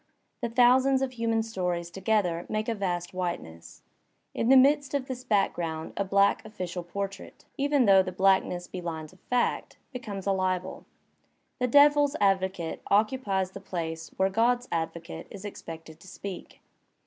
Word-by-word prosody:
The 235 - -1
thousands 260 +3 +4
of 265 - -2
human 230 -2 0
stories 180 -6 -3
together 190 -3 0
make 215 0 -2
a 230 - +1
vast 180 -4 -3
whiteness. 170 - -5 0.5
In 230 - 0
the 270 - +8
midst 285 +2 +4
of 275 -2 -1
this 255 -2 -6
background 175 -8 -1
a 200 - 0
black 200 +1 +3
official 185 -5 -5
portrait, 195 +3 -6
even 280 -2 +2
though 195 -2 +7
the 185 0 -4
blackness 190 -1 +2
be 185 - -7
lines 160 -1 -6
of 185 - -21
fact, 250 -1 -1 0.2
becomes 210 -6 -6
a 200 - +2
libel. 185 -1 -2 0.7
The 250 - +1
Devil's 290 +2 +5
Advocate 190 -4 0
occupies 200 -3 +1
the 195 - -8
place 165 -3 -5
where 190 0 +3
God*s 240 +4 +2
Advocate 170 +1 -4
is 200 0 -9
ex 205 - -7
pected 160 -1 -10
to 190 - -16
speak. 190 0 -8
195 Hz, 160 wpm, -28 LUFS, 180-240 Hz, 0.7 s, the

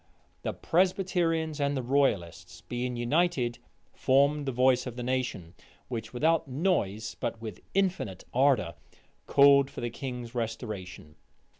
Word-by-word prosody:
The - - -3
Presbyterians 170 -4 +1
and 140 0 +1
the 130 - -2
royalists, 90 -9 0
being 125 +3 -3
united, 120 -1 +1 0.3
formed 140 +2 +2
the - - +1
voice 130 +1 +3
of 120 - -6
the 125 - -5
nation, 120 -9 -2 0.4
which, 110 -3 -5
without 155 +6 +1
noise, 130 - -1
but 115 - -3
with 110 -5 -8
infinite 185 - 0
ardor, 130 -10 +3 0.5
called 140 -1 +6
for - - -8
the 120 -1 -3
king's 125 -2 -6
restoration. 105 -9 -5
125 Hz, 130 wpm, -29 LUFS, 115-145 Hz, 0.5 s, called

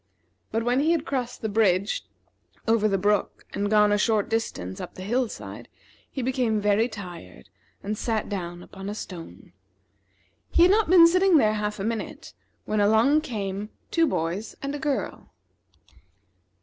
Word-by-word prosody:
But 225 +1 0
when 245 +2 +2
he 315 +4 +3
had 325 -2 -1
crossed 250 -6 -3
the - - +1
bridge 200 -2 +1 0.6
over 225 -1 +3
the 195 -2 +1
brook, 205 +1 0
and 205 0 -1
gone 210 -1 +5
a 205 - +2
short 215 -1 +1
distance 95 - -3
up - - -8
the 185 - -7
hill 240 +4 0
side, - - -9 0.4
he 265 - -4
became 245 -4 +1
very 210 +2 +2
tired, 170 - -10 0.3
and 210 +2 -2
sat 220 0 -2
down 175 -3 -5
upon 195 +1 -8
a 205 - -4
stone. 180 -5 -9 1.0
He 340 - +4
had 360 - +6
not 425 -3 +3
been 350 -2 +9
sitting 365 +1 +5
there 215 -6 +4
half 210 -1 -2
a - - -3
minute, 225 +1 -4 0.3
when 215 - 0
along 225 +9 +4
came 205 -5 -4 0.2
two 330 -1 +3
boys 180 - -2
and 280 +1 -2
a 290 - -4
girl. 285 -1 -3
215 Hz, 165 wpm, -25 LUFS, 200-260 Hz, 1.0 s, been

